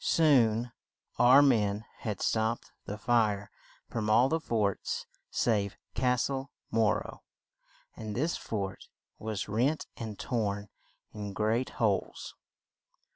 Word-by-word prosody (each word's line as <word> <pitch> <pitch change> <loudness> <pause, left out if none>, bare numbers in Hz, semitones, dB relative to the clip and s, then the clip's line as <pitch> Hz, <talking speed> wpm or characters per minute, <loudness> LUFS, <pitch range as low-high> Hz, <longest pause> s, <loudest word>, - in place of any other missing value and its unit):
Soon 120 -7 +4 0.5
our 130 +4 +8
men 110 -5 +2
had 105 -4 -3
stopped 110 +1 0
the 105 - -5
fire 105 -3 +1 0.4
from 110 -2 -2
all 120 +5 +5
the 160 - +1
forts 110 - -1 0.2
save 105 -4 0 0.2
Cas 125 0 +2
tle 135 0 -3 0.2
Mor 110 -2 +2
ro, - - -10 0.7
and 110 -2 -6
this 155 +7 0
fort 95 -3 -4 0.3
was 110 -3 -3
rent 125 +9 +1
and 110 -3 -6
torn 105 -4 -2 0.4
in 105 -2 -5
great 110 +5 +1
holes. 105 -4 0
110 Hz, 120 wpm, -30 LUFS, 105-125 Hz, 0.7 s, our